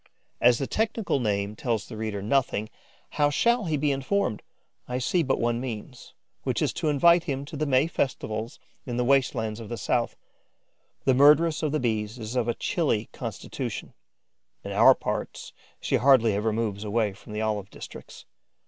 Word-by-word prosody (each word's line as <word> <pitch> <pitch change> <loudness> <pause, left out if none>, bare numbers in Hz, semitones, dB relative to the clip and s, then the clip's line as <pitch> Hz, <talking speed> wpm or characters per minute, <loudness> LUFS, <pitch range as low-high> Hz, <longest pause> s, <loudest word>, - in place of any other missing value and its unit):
As 120 -1 +6
the 135 - -2
technical 220 - -1
name 105 -3 -1
tells 115 -3 -2
the 115 - -8
reader 110 -2 -4
nothing, 110 -2 0 0.5
how 145 - +5
shall 235 +8 +2
he 155 -3 0
be 145 0 +1
informed? 135 - -1 0.5
I 125 - -2
see 150 +8 +1
but 135 -4 0
one 120 0 0
means, 125 0 -7 0.3
which - - -1
is - - 0
to 155 - -1
invite 170 +4 +5
him 140 -3 -3
to 155 - -9
the 150 +1 -1
May 130 +1 +4
festivals, 115 -6 -3 0.3
in 120 -1 -3
the 125 - +1
waste 135 0 +3
lands 110 -1 -3
of 110 -2 -8
the 120 - -4
South. 120 0 0 0.9
The 130 - +5
murderess 150 +4 +5
of 155 -3 0
the 155 - 0
Bees 110 -1 -1
is 115 +1 -6
of 120 -2 +1
a 120 - 0
chilly 140 -11 0
constitution; - - -5 0.7
in - - -6
our - - +7
parts, - - -5 0.3
she - - +1
hardly 125 -5 +5
ever 105 +2 0
moves 105 -2 -2
away 105 -1 0
from 105 - -12
the 105 - -2
olive 105 -3 -2
districts. - - -11
125 Hz, 180 wpm, -26 LUFS, 110-145 Hz, 0.9 s, our